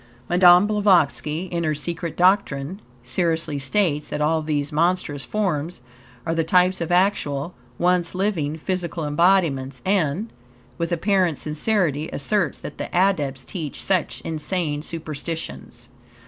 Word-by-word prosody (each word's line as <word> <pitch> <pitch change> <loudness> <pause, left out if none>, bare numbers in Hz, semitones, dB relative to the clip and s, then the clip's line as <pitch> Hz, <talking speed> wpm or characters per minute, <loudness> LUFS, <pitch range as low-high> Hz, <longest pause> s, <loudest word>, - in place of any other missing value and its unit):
Madame 180 +1 +6
Blavatsky, 175 - +2
in 170 -1 -1
her 155 -1 0
"Secret 170 +2 -4
Doctrine," 180 -2 +1 0.2
seriously 160 +2 -1
states 150 0 +1
that - - -3
all 160 +2 +1
these 150 -1 -2
monstrous 155 -3 0
forms 175 - -2 0.5
are 165 - 0
the 165 0 +1
types 180 +2 +3
of 170 - -2
actual, 175 -5 +1 0.2
once 180 0 +1
living 175 -6 -1
physical 170 -1 -3
embodiments, 145 -5 +2
and, 190 +2 0 0.5
with 170 +1 -2
apparent 180 -2 +1
sincerity, 155 -1 0
asserts 175 +4 0
that - - -9
the - - -4
Adepts 150 -9 +1
teach 160 -6 -5
such 185 -4 -1
insane 155 -1 -2
superstitions. 160 0 -6
165 Hz, 125 wpm, -23 LUFS, 150-185 Hz, 0.5 s, Madame